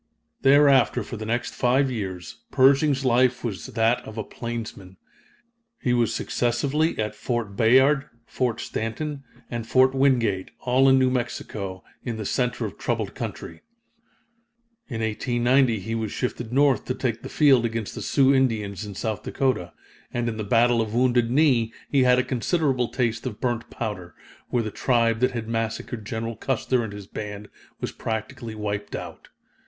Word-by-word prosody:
Thereafter, 140 -2 +5
for - - -7
the 110 -1 -6
next 120 +2 -1
five 130 +2 +2
years, 95 -6 -5
Pershing's 135 +1 +4
life 125 0 +3
was 100 -9 -4
that 115 +2 +1
of 110 - -10
a 110 - -2
plainsman. 110 -6 -7 0.8
He 125 - 0
was 120 -2 +2
successively 140 +7 0
at 105 -1 -2
Fort 120 -5 -3
Bayard, 130 +5 +4 0.2
Fort 120 -3 -1
Stanton, 140 +6 -4 0.3
and 120 -2 -4
Fort 130 +1 +4
Wingate, 120 -8 +2
all 130 +2 +4
in 135 - +6
New 130 -1 +3
Mexico, 100 -6 -4 0.2
in 120 -3 -4
the 110 - -5
center 125 +1 -1
of 100 - -7
troubled - - -2
country. - - -6 1.3
In 115 -4 -4
1890 120 +2 +2
he 110 +4 -4
was 110 -2 -2
shifted 120 -2 -3
north 140 0 +3
to 130 - -2
take 120 -3 -2
the - - -7
field 135 -5 +4
against 115 -2 -3
the - - -6
Sioux 135 -1 +3
Indians, 110 -8 0
in 105 -2 -7
South 110 +1 -3
Dakota, 130 - -1 0.4
and 120 0 -1
in 110 -2 -2
the 110 - -3
Battle 120 +2 +3
of 110 0 -3
Wounded 120 -1 +3
Knee 125 -4 +3 0.2
he 140 - +4
had 125 0 +5
a 125 - +3
considerable 130 0 0
taste 115 -1 -1
of 110 -5 -6
burnt 120 -2 -2
powder, 90 -5 -5 0.3
where 120 -2 +1
the 110 - -4
tribe 115 -1 +1
that 125 +1 +2
had 115 -2 -4
massacred 115 0 -3
General 115 0 -3
Custer 130 0 0
and 110 - -5
his 105 -1 -8
band 105 0 -7 0.3
was - - -3
practically 115 +1 -5
wiped 105 -1 -4
out. - - -8
120 Hz, 165 wpm, -24 LUFS, 110-130 Hz, 1.3 s, in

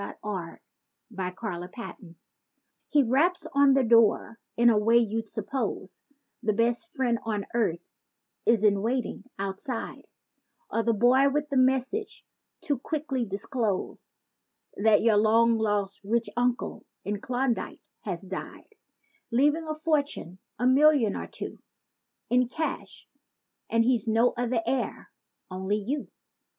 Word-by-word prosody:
49 190 -5 -5 0.5
THE 190 -4 -3
COLLECTOR 180 -2 -7 0.7
He 290 -2 +4
raps 295 +9 +2
on 280 -1 +5
the 270 - +3
door 230 0 +3 0.2
in 235 0 +6
a 220 - +3
way 225 +3 +4
you'd 225 -1 0
suppose 220 -3 -4 0.4
The 220 -3 +1
best 235 +9 0
friend 245 -4 +1
on 210 -3 -2
earth 180 -8 0 0.6
is 225 -2 +4
in 200 -2 +4
waiting 245 +3 -2
outside; 195 +5 -5 0.6
Or 230 - +1
the 230 0 +1
boy 255 +5 +5
with 295 +1 -1
the 280 - 0
message 265 - 0 0.4
to 285 -4 -1
quickly 275 -4 -2
disclose 205 0 -3 0.6
That 215 0 +4
your 225 -2 +4
long 225 +2 +4
lost 205 -2 -1
"rich 230 +3 0
uncle" 245 0 -1 0.2
in 205 +1 -3
Klondike 250 -1 -2 0.2
has - - -5
died, - - -8 0.6
Leaving 295 +7 +2
a 310 - -2
fortune—a 285 - -2
million 265 -4 +5
or - - -5
two— - - -8 0.7
In 250 0 +3
cash, 315 +4 -5 0.6
and 230 0 +3
he's 240 -2 +1
no 230 +2 +3
other 240 -1 -1
heir, 255 +1 -2 0.4
only 190 +3 -1
you. 260 +8 -3
235 Hz, 125 wpm, -27 LUFS, 210-265 Hz, 0.7 s, in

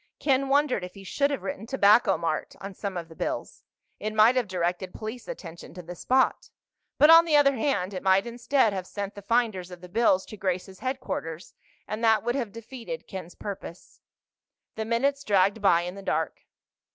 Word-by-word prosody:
Ken 270 -1 +1
wondered 280 -7 +2
if 180 - -8
he 195 - -11
should 280 +9 0
have 280 - -3
written 280 -6 -5
"Tobacco 225 -3 +4
Mart" 165 -2 -3
on 195 0 -7
some 195 -1 -5
of 170 -1 -5
the 165 - -13
bills. - - -4 0.4
It 215 0 -4
might 220 +4 +6
have 250 -4 +1
directed 180 0 -2
police 225 +3 -7
attention 170 -1 -9
to 180 - -8
the 175 +2 -8
spot. 255 +9 +1 0.5
But, 300 +2 +7
on 330 0 +9
the 325 -3 +1
other 280 -1 +5
hand, 205 -7 -1
it 185 - -4
might 190 +1 +3
instead 240 -1 +1
have 185 -2 -4
sent 200 0 -5
the 205 - -10
finders 210 -4 0
of 180 -1 -11
the 180 - -10
bills 190 -1 +2
to 215 - -10
Grace's 190 0 -3
headquarters, 255 - -4 0.3
and 215 +2 -4
that 220 -1 +4
would 240 +1 0
have 245 -6 -2
defeated 235 +2 -8
Ken's 185 -3 -8
purpose. 190 -3 -8 0.7
The 220 - -4
minutes 275 +5 0
dragged 200 0 +2
by 175 -4 +4
in 180 +1 -5
the 200 - -9
dark. 160 -5 -2
210 Hz, 195 wpm, -27 LUFS, 185-250 Hz, 0.7 s, on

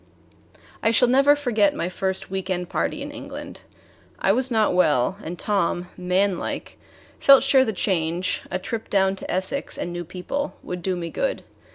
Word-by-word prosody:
I - - +3
shall 230 +2 +4
never 275 +4 +5
forget 225 -8 +2
my 170 - -2
first 190 +1 -2
week 190 0 -3
end 180 -1 -2
party - - -2
in - - -6
England. - - -8 0.6
I 195 - +2
was 255 +5 +1
not 220 -5 +2
well, 155 -4 +3
and 175 +2 -6
Tom, 180 -3 -1
manlike, 180 +1 -1 0.4
felt 275 -1 +7
sure 270 -1 +5
the 225 - -1
change, 175 -3 0
a 185 - -1
trip 220 +4 -5
down 195 -1 +2
to - - -8
Essex 190 +10 -1
and 175 - -4
new 175 0 -4
people, 185 - -4
would 180 0 -5
do 185 +1 -1
me 170 -1 -5
good. - - -2
190 Hz, 175 wpm, -23 LUFS, 180-230 Hz, 0.6 s, felt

